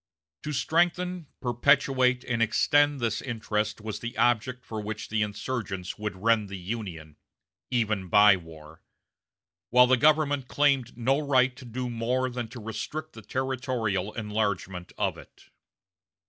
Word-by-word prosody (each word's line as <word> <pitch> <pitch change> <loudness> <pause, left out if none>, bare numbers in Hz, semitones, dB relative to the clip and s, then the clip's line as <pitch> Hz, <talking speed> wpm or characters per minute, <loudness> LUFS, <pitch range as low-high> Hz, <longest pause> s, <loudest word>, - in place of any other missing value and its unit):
To 150 - -4
strengthen, 175 +4 0
perpetuate, 130 0 +3
and 115 -2 -1
extend 145 +5 +3
this 115 -3 -1
interest 110 -3 -2
was 110 -1 -5
the 120 0 -6
object 120 +1 +1
for 110 -1 -5
which 110 +1 -5
the 110 0 0
insurgents 105 -3 -4
would 105 -2 -3
rend 110 -3 +3
the 100 - -6
Union, 90 -6 -6 0.5
even 110 -6 0
by 105 +1 +7
war; 80 -3 -12 0.9
while 125 +1 +7
the 130 +1 +4
government 145 -1 +3
claimed 135 -5 +1
no 135 +4 +2
right 130 -3 +2
to 130 -1 -12
do 125 +2 -4
more 125 +2 -1
than 120 -2 -4
to 120 +2 -10
restrict 150 +8 -5
the 110 - -10
territorial 125 -5 -2
enlargement 105 -5 -2
of - - -1
it. - - -17
120 Hz, 140 wpm, -27 LUFS, 105-130 Hz, 0.9 s, by